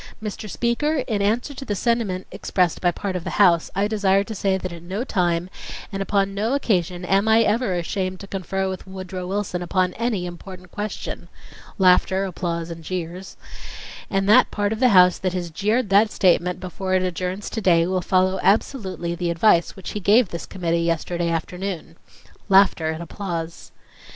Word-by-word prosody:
Mr. 215 0 -6
Speaker, 260 +7 0
in 210 -4 -1
answer 225 +8 0
to 270 - -8
the 210 -6 -2
sentiment 215 -5 0
expressed 180 -3 0
by 175 - +3
part 190 +2 -4
of 180 - -3
the - - -4
House, 175 -5 +4
I 200 +2 +2
desire 200 -2 +2
to 220 - -7
say 195 -2 0
that 185 -2 -5
at 170 - -9
no 190 +7 -4
time 175 -7 0 0.4
and 195 -1 -3
upon 195 0 0
no 220 +6 0
occasion 180 -9 0
am 195 +3 +2
I 220 +1 +5
ever 220 -3 +1
ashamed 185 +1 -3
to - - -7
confer 195 0 -2
with 190 0 -6
Woodrow 185 -1 -6
Wilson 190 -2 -2
upon 180 +1 0
any 225 -5 -1
important 180 +1 -10
question 210 -4 -5 0.5
(laughter, 190 +1 +4
applause, 170 -2 -3
and, 165 -1 -8
jeers) 180 +2 -5 0.7
and 195 0 0
that 225 +5 +6
part 205 0 -1
of 220 - -5
the 255 -1 +5
House 180 -3 +6
that 185 -1 -1
has 175 -2 -3
jeered 210 +6 0
that 205 +2 +5
statement 180 -2 +2
before 185 +1 -3
it 185 - +2
adjourns 185 +2 -3
to 225 - -3
day 170 -4 +4
will 185 +1 0
follow 185 +1 +2
absolutely 190 - 0
the 175 0 -2
advice 170 0 +3
which 190 -2 -7
he 210 - -4
gave 205 +2 +4
this 170 - -6
committee 170 -2 -1
yesterday 170 +1 -1
afternoon. 170 0 -4 0.5
(Laughter 190 -5 +4
and 160 +1 -4
applause.) 170 -2 -6
190 Hz, 180 wpm, -22 LUFS, 175-205 Hz, 0.7 s, that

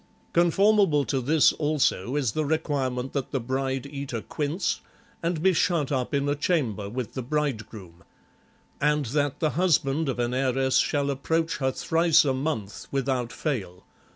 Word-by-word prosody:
Conformable 175 -3 +4
to 135 0 -1
this, 150 +4 +4
also, 145 -6 0
is 135 -7 +1
the 155 - -1
requirement 140 -4 -1
that 140 -3 -2
the 135 - -1
bride 130 +2 -2
eat 140 -1 -6
a 115 - -3
quince 155 +5 -2 0.4
and 170 -1 -1
be 190 0 +5
shut 160 -4 +1
up 130 -3 -1
in 140 0 0
a 145 - +2
chamber 130 - -1
with 120 0 -5
the 130 - -3
bride 135 -5 -2
groom; 90 -6 -12 0.8
and 150 0 +2
that 145 +3 -1
the 155 -2 +1
husband 160 -4 +1
of 130 - -2
an 120 0 -1
heiress 130 0 +1
shall 140 -2 +1
approach 160 +4 -1
her 130 -2 0
thrice 165 +2 +3
a 135 - +2
month 130 -7 -3
without 130 -3 -1
fail. 100 - -4
140 Hz, 165 wpm, -26 LUFS, 130-155 Hz, 0.8 s, be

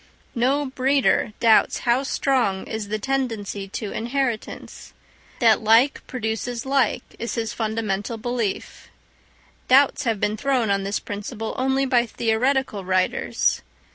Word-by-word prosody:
No 270 +4 +1
breeder 265 -4 +1
doubts 225 -2 +4
how 245 +1 +2
strong 255 -8 0
is 220 -2 -5
the 215 +1 -2
tendency 220 -6 -3
to 205 +1 -5
inheritance; 240 -1 -4 0.4
that 230 -2 +4
like 230 +6 +4
produces 235 0 -3
like 270 -2 +1 0.2
is 235 - -3
his 225 -2 -2
fundamental 220 -1 -2
belief: 235 -3 -4 0.8
doubts 275 +2 +4
have 225 -4 0
been 210 +2 0
thrown 250 -3 +1
on 200 0 +1
this 200 +1 -1
principle 210 +2 -5
only 265 +1 +1
by 245 -2 +2
theoretical 230 -1 0
writers. 185 0 0
235 Hz, 125 wpm, -23 LUFS, 215-260 Hz, 0.8 s, doubts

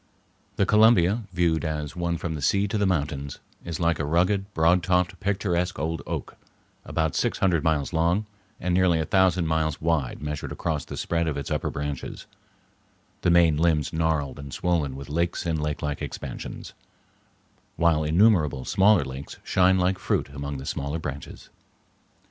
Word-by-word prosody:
The 100 - +2
Columbia, 105 0 +4
viewed 85 -3 +1
as 75 -2 -3
one 85 -1 -1
from 85 -1 -4
the 75 - -5
sea 100 +8 +2
to 105 - -1
the 100 - +2
mountains, 70 -5 -2 0.3
is 85 -2 -5
like 85 -2 +1
a - - 0
rugged, 90 +6 +1
broad 85 +3 +4
topped, 90 0 +1
picturesque 90 -3 -1
old 80 +3 -2
oak - - -5 0.5
about 80 -1 -1
six - - 0
hundred 85 -5 +2
miles 80 -1 0
long 85 +6 +1 0.3
and 90 - -1
nearly 90 -2 +3
a 80 - 0
thousand 95 -2 +3
miles 80 -1 0
wide 80 -5 -1
measured 75 -1 -5
across 80 -4 -2
the - - -7
spread 85 -1 -1
of 75 - -2
its 70 - -5
upper - - -1
branches, 70 -1 -5 1.0
the - - +2
main 85 -3 +5
limbs 80 -2 +1
gnarled 80 -4 -1
and 70 -2 -7
swollen 80 -7 0
with 70 0 -8
lakes 85 +4 -1
and 80 -2 -1
lakelike 75 -1 -3
expansions, - - -7 1.0
while 85 -2 +2
innumerable 80 - +3
smaller 100 0 +4
lakes 65 +1 -8
shine 95 0 +3
like 90 +1 +1
fruit - - -1
among 70 0 -5
the 65 - -8
smaller 70 +3 -3
branches. 75 -3 -7
80 Hz, 165 wpm, -25 LUFS, 75-90 Hz, 1.0 s, main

